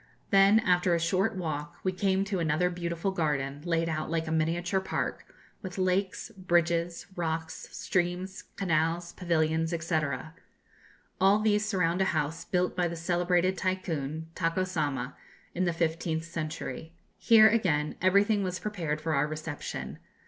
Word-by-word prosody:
Then, 195 +2 +6
after 180 -4 +3
a - - +1
short 190 +6 +1
walk, 155 -5 -4
we 185 - +1
came 190 +1 +1
to 195 -2 -2
another 165 +2 +1
beautiful 170 +1 -2
garden, 145 -5 -1
laid 165 -1 +1
out 155 -1 -2
like 165 0 -1
a 160 - -4
miniature 170 +4 +1
park, 190 - -3 0.3
with 185 -2 -7
lakes, 185 +3 0
bridges, 170 -2 +1
rocks, 160 -1 -3
streams, 180 +1 -2
canals, 170 -1 0
pavilions, 165 -1 0
&c. 165 -1 +2 1.2
All 195 +2 +6
these 210 -1 +2
surround 180 -3 +1
a - - +4
house 155 +3 -2
built 180 0 0
by 180 -1 +1
the 170 - -4
celebrated 175 +2 +1
Tycoon, 160 -5 -2
Tako 165 +2 0
Sama, 145 -7 -2 0.4
in 185 +1 0
the 175 - +2
fifteenth 165 -1 -1
century. 165 0 -5 0.3
Here, 220 -2 +7
again, 160 -9 +1
everything 200 +3 +4
was 185 -1 -2
prepared 170 -8 -3
for 160 +1 -2
our 140 +1 +2
reception. 155 -1 -5
175 Hz, 145 wpm, -29 LUFS, 160-185 Hz, 1.2 s, Here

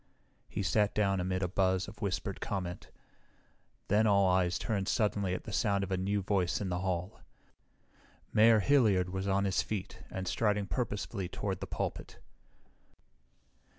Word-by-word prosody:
He - - -3
sat 105 -1 +2
down 100 -2 +2
amid 95 +1 -1
a - - +1
buzz 95 0 +1
of 105 +1 -12
whispered 95 -1 -3
comment. 90 -3 -4 1.0
Then 110 +2 +3
all 100 -2 +4
eyes 90 -1 +2
turned 100 -4 -2
suddenly 100 -5 +1
at - - -6
the 110 - -7
sound 100 -2 +1
of 95 - -5
a - - +2
new 100 +2 -1
voice 95 -3 +1
in 100 - -3
the 90 0 -1
hall. 90 +1 -3 1.1
Mayor 110 0 +6
Hilliard 100 -9 +3
was 95 +1 -3
on 100 0 +2
his 95 -1 +1
feet 100 -2 -5
and 95 -1 -5
striding 105 +1 +1
purposefully 105 -4 -3
toward - - -3
the - - -5
pulpit. - - -4
100 Hz, 155 wpm, -32 LUFS, 95-105 Hz, 1.1 s, Mayor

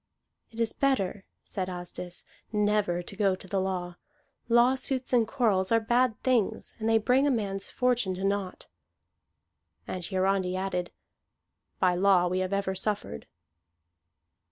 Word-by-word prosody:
"It 230 - -12
is 230 -1 +1
better," 205 -8 0 0.2
said 185 -1 -4
Asdis, 175 0 -7 0.3
"never 210 -4 +1
to 200 - -8
go 195 -2 +2
to 190 - -13
the 195 0 0
law. 180 -2 -3 0.5
Lawsuits 255 +2 +2
and 235 -3 +4
quarrels 210 -8 +1
are 230 - +5
bad 240 +1 +1
things, 245 -6 +1
and 220 0 0
they 225 - +5
bring 255 +6 +3
a - - +3
man's 200 -6 -2
fortune 245 -7 0
to 190 - -6
naught." 195 -1 -2 1.2
And 185 - -4
Hiarandi 185 0 0
added, 185 -2 -2 0.9
"By 180 -1 +3
law 185 0 +4
we 185 +1 0
have 185 0 -2
ever 200 -1 0
suffered." 190 - -3
200 Hz, 140 wpm, -28 LUFS, 185-230 Hz, 1.2 s, are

